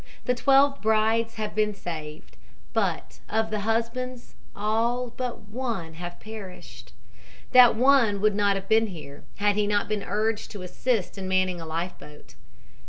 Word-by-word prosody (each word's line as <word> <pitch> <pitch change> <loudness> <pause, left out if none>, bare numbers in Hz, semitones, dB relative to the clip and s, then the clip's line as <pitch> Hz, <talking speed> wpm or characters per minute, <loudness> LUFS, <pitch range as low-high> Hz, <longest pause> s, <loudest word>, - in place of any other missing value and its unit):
The 250 - +2
twelve 275 +2 +4
brides 220 +1 +2
have 215 -1 -4
been 210 -1 +1
saved, 155 -5 -7 0.4
but - - -1
of 220 0 0
the 215 - -1
husbands 235 +4 -2 0.2
all 230 +4 0
but 250 -2 -4
one 225 -8 -4
have 175 +1 -8
perished. 215 -4 -10 0.6
That 250 -3 +8
one 240 -4 +4
would 210 +1 +3
not 200 -1 +2
have 195 0 -5
been 220 +1 +4
here, 155 -7 -10
had 205 0 +2
he 210 0 +1
not 205 0 +1
been 215 -1 -2
urged 210 +2 -1
to 200 -3 -7
assist 200 +1 -1
in 190 - -4
manning 185 -2 +1
a 165 - -7
life 165 +3 -4
boat. 150 0 -14
215 Hz, 160 wpm, -26 LUFS, 190-230 Hz, 0.6 s, That